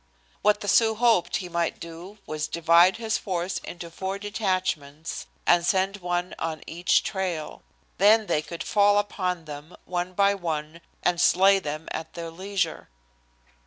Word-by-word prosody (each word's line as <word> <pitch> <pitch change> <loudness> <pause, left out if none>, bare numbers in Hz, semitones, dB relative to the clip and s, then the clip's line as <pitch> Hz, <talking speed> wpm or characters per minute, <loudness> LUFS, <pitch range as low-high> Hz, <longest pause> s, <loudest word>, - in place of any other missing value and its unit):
What 210 0 +3
the 205 - -5
Sioux 220 +2 +4
hoped 225 -5 +3
he 185 - -2
might 170 -1 -1
do 170 +5 -9
was 155 0 -3
divide 170 +3 +4
his 225 -1 -1
force 180 -1 -2
into 170 -1 -8
four 190 +3 -4
detachments 185 -7 -3 0.2
and 175 0 +4
send 190 +2 +1
one 175 -1 -2
on 160 -1 -3
each 175 +2 +2
trail. 180 -6 -3 0.4
Then 215 +3 +6
they 150 - +1
could 170 +2 -7
fall 205 0 +4
upon 185 -4 -1
them, 150 +3 -9
one 180 0 -3
by 200 +1 +3
one, 165 -3 -4 0.2
and 175 -1 +2
slay 195 +3 +5
them 155 -2 -5
at 160 0 -6
their 165 -1 -6
leisure. 185 -1 -3
180 Hz, 155 wpm, -26 LUFS, 165-200 Hz, 0.4 s, Then